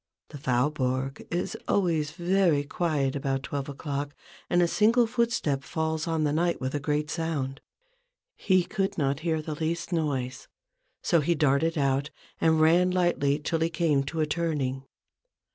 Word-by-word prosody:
The 145 - -9
Faubourg 130 +1 -1
is 175 +1 -2
always 165 -6 +1
very 175 -2 +2
quiet 145 -3 -1
about 135 -1 -1
twelve 140 0 -4
o'clock, 145 0 -4 0.3
and 175 - +3
a - - +3
single 230 +6 +4
footstep 230 - 0
falls 160 +1 -2
on 160 -1 0
the 145 -1 +1
night 170 +2 +1
with 130 +1 -3
a 145 - 0
great 150 +1 -1
sound. 145 -5 -3 0.7
He 185 -2 +2
could 195 +3 -2
not 140 -2 0
hear 160 -1 -1
the 155 - -4
least 165 +3 -3
noise: 135 -6 -2 0.6
so 170 - +3
he 170 +4 +1
darted 150 +2 +2
out 140 0 +1 0.3
and 160 -1 +3
ran 170 +3 +5
lightly 175 -6 +1
till 160 +2 -2
he 165 +1 +1
came 160 -5 +1
to 160 +3 -2
a - - +3
turning. 145 -5 -2
155 Hz, 160 wpm, -27 LUFS, 140-170 Hz, 0.7 s, ran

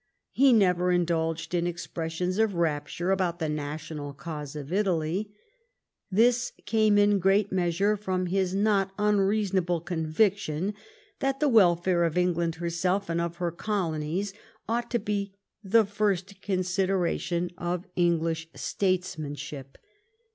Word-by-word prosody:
He 270 0 +5
never 180 -5 +3
indulged 165 -2 0
in 175 0 +1
expressions 175 +2 -3
of 220 -4 +2
rapture 165 +2 -1
about 185 -3 0
the 160 -3 -2
national 150 0 -5
cause 150 0 -7
of 145 +2 -6
Italy. 190 0 0 0.8
This 235 +5 +3
came 215 -1 +3
in 205 -1 +4
great 195 +2 +2
measure 190 +3 +1
from 185 -3 -2
his 190 +1 0
not 200 -2 +2
unreasonable 200 -4 +1
conviction 170 +2 0 0.5
that 270 -1 0
the 300 - +3
welfare 180 -6 +4
of 165 0 0
England 170 -2 +1
herself 175 +3 -1
and 170 0 0
of 170 0 -3
her 175 -1 -2
colonies 175 0 -2 0.3
ought 235 +1 -1
to 240 - +1
be 200 -3 -3 0.3
the 215 +3 +4
first 200 -2 -1
consideration 185 -2 0
of 175 +1 -3
English 165 -2 +1
statesman 180 -6 -1
ship. 135 -1 -8
180 Hz, 125 wpm, -27 LUFS, 165-200 Hz, 0.8 s, He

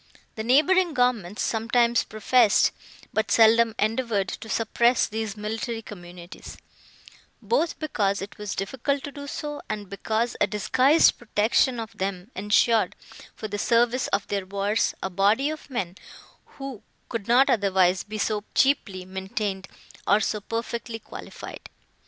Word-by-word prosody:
The 220 - -5
neighbouring 310 +7 +3
governments 230 -6 0
sometimes 235 +1 +2
professed, 215 +1 +3 0.4
but 220 -1 0
seldom 225 +1 +5
endeavoured, 215 -3 0
to 220 - -7
suppress 235 +2 +2
these 220 -1 -4
military 225 +2 -4
communities; 175 -3 -11 0.8
both 400 -9 0
because 200 -10 -1
it 195 +1 -7
was 210 -1 -4
difficult 265 +8 -2
to 285 - -6
do 285 0 -9
so, 295 +1 -5
and 205 -2 -5
because 220 +4 -1
a - - +4
disguised 255 +9 +3
protection 235 +2 +1
of 225 -1 -7
them 190 +2 -4
ensured, 210 +3 +2 0.4
for 215 - -6
the 205 0 -4
service 240 +3 +2
of 200 0 -1
their 200 -2 -3
wars, 200 +3 0
a 190 - -2
body 210 +10 +2
of 310 -1 -9
men, 190 -9 -3 0.6
who 270 -5 -7 0.3
could 225 -4 -5
not 250 +3 +5
otherwise 190 -3 +3
be 215 +1 -7
so 210 0 -1
cheaply 235 -10 +1
maintained, 190 +1 -4 0.4
or 205 - +5
so 210 0 -1
perfectly 230 +1 -4
qualified. - - -10
220 Hz, 140 wpm, -25 LUFS, 200-245 Hz, 0.8 s, seldom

